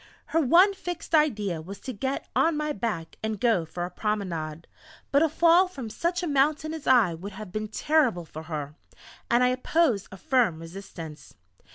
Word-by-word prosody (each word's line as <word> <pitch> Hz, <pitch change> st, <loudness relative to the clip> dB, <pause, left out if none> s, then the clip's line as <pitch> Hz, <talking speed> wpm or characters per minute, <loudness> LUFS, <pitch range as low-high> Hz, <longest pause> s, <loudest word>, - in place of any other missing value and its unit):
Her 325 Hz, -, +1 dB
one 350 Hz, +8 st, +6 dB
fixed 355 Hz, -3 st, -7 dB
idea 210 Hz, -, +2 dB
was 195 Hz, +5 st, -9 dB
to 260 Hz, -, -5 dB
get 265 Hz, +5 st, -3 dB
on 325 Hz, -2 st, +3 dB
my 300 Hz, 0 st, -1 dB
back 200 Hz, -, -4 dB
and 220 Hz, -2 st, -3 dB
go 220 Hz, -8 st, +2 dB
for 175 Hz, +2 st, -4 dB
a 180 Hz, -, -7 dB
promenade. 170 Hz, -6 st, -3 dB, 0.5 s
But 280 Hz, -, +4 dB
a 325 Hz, -, +4 dB
fall 340 Hz, +4 st, +5 dB
from 265 Hz, -11 st, -7 dB
such 350 Hz, -, -1 dB
a -, -, -1 dB
mountain 300 Hz, +2 st, +1 dB
as 320 Hz, -3 st, -7 dB
I 235 Hz, -9 st, +5 dB
would 190 Hz, +5 st, -8 dB
have 195 Hz, -1 st, -8 dB
been 215 Hz, +2 st, -3 dB
terrible 245 Hz, -, +1 dB
for 155 Hz, 0 st, -9 dB
her, 150 Hz, -3 st, -5 dB, 0.6 s
and 240 Hz, +1 st, +4 dB
I 250 Hz, -, +4 dB
opposed 255 Hz, -, +1 dB
a 190 Hz, -, -9 dB
firm 235 Hz, -6 st, +2 dB
resistance. 165 Hz, -3 st, -9 dB
225 Hz, 185 wpm, -26 LUFS, -, 0.6 s, one